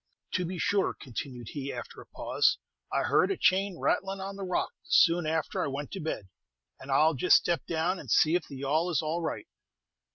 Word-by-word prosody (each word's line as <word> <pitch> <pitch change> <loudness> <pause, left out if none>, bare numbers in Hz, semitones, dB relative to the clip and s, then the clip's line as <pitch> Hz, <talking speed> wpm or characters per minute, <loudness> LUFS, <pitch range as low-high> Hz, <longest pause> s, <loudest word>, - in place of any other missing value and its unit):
"To 180 - 0
be 180 +2 -4
sure," 200 +2 +1
continued 125 -1 -6
he, 140 -2 -5
after - - -8
a - - -15
pause, - - +1 0.3
"I - - +1
heard - - +3
a 390 - -1
chain 190 -1 +2
rattlin' 195 +3 0
on 195 +1 -5
the 200 - -8
rock 180 -1 -1
soon 170 -1 +4
after 160 -1 -1
I - - -1
went 140 +1 -5
to 195 - -5
bed, 150 - -4 0.5
and 135 - -11
I 135 - +5
'll 160 - +4
Just 150 +6 +4
step 170 -1 -1
down 170 +3 0
and - - -10
see 160 0 +4
if 175 -1 0
the 140 - -9
yawl 150 +6 0
is 160 -5 0
all 160 +3 -1
right." 165 - -3
165 Hz, 215 wpm, -29 LUFS, 145-185 Hz, 0.5 s, I